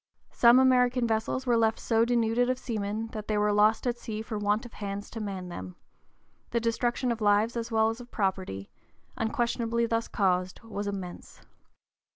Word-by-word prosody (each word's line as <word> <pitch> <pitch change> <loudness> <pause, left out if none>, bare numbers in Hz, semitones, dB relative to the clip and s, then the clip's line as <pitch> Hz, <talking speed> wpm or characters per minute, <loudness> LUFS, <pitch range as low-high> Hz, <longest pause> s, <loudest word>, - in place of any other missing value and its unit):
Some 235 +1 +6
American 250 -1 +4
vessels 225 +3 -1
were 240 -2 +3
left 225 -1 +2
so 225 0 +2
denuded 240 0 +2
of 255 - +1
seamen 220 -2 -3
that 215 -2 -7
they 215 - 0
were 210 0 +2
lost 215 +3 +3
at 240 -1 -1
sea 220 -1 -5
for 220 - -5
want 210 +3 0
of 240 - -11
hands 200 0 -6
to 225 - -6
man 195 -4 -5
them; 95 - -7 0.7
the 235 - 0
destruction 240 +2 0
of 230 -1 -3
lives 210 +3 +3
as 235 0 -4
well 220 0 +3
as 225 +2 -5
property, 190 - -2 0.4
unquestionably 235 +1 0
thus 230 0 -1
caused, 185 -2 0
was 205 -2 -5
immense. 190 -3 -7
225 Hz, 175 wpm, -28 LUFS, 205-235 Hz, 0.7 s, Some